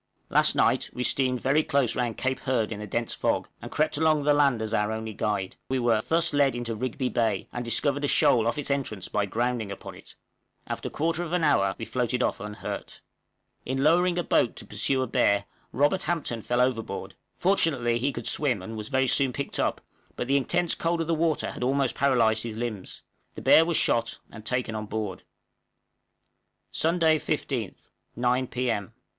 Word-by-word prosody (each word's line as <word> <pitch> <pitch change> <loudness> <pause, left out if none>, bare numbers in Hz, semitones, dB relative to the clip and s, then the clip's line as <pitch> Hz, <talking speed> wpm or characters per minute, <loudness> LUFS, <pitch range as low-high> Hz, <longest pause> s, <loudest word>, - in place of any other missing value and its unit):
Last - - +4
night - - +2
we 125 - -3
steamed 130 -2 +1
very 140 +4 +3
close 140 -6 +1
round 120 -3 -1
Cape 130 0 -1
Hurd 120 -5 0
in 105 -1 -5
a 105 - -6
dense 115 +3 -2
fog, - - 0
and - - -7
crept 155 0 0
along 155 -2 +3
the 145 +1 +4
land 140 -5 +3
as 110 0 -3
our 105 0 +1
only 110 0 -4
guide: 100 -2 -2
we 130 - 0
were 120 -3 +2
thus 165 -1 +2
led 140 -3 +3
into 120 -1 -3
Rigby 130 +3 -2
Bay, 115 -3 0
and 120 - -3
discovered 140 +4 0
a - - +2
shoal 115 -4 +4
off 120 - 0
its 145 -1 -1
entrance 130 -9 -2
by 105 -1 0
grounding 120 -1 -1
upon 100 - -8
it. - - -14 0.5
After - - -4
a - - -7
quarter 165 +2 -1
of 175 -1 -4
an 180 -2 +1
hour 100 -10 +3
we 115 - -5
floated 125 +1 -1
off - - -1
unhurt. 105 +1 -6 0.6
In 135 +1 -2
lowering 175 +3 +3
a 175 - +1
boat 120 - +2
to - - -5
pursue 130 +6 0
a - - -1
bear, 100 -3 +2 0.3
Robert 145 +9 +2
Hampton 150 -9 -2
fell 120 +3 0
overboard; 125 -3 -2 0.2
fortunately 140 -11 +2
he 140 +4 0
could 120 -3 -7
swim, 125 -10 +1
and 110 +4 -7
was 105 -1 -6
very 130 -1 +2
soon 135 +1 +2
picked 140 +2 -4
up, - - 0 0.3
but 120 - -3
the 135 - +2
intense 165 +5 +1
cold 165 0 -1
of - - -1
the 165 - 0
water 160 -1 0
had - - -6
almost 135 0 +1
paralyzed 120 -5 +2
his 110 -1 -6
limbs. 115 -5 -5 0.3
The - - -8
bear 160 - +7
was 170 -1 +2
shot 115 -1 +1
and 110 - -10
taken 125 -1 -2
on 110 -1 -4
board. 105 -3 -4 1.5
_Sunday, 165 -1 +3
15th, 135 - -4 0.2
9 125 +2 +1
P.M. 115 -5 -2
125 Hz, 195 wpm, -26 LUFS, 110-145 Hz, 1.5 s, bear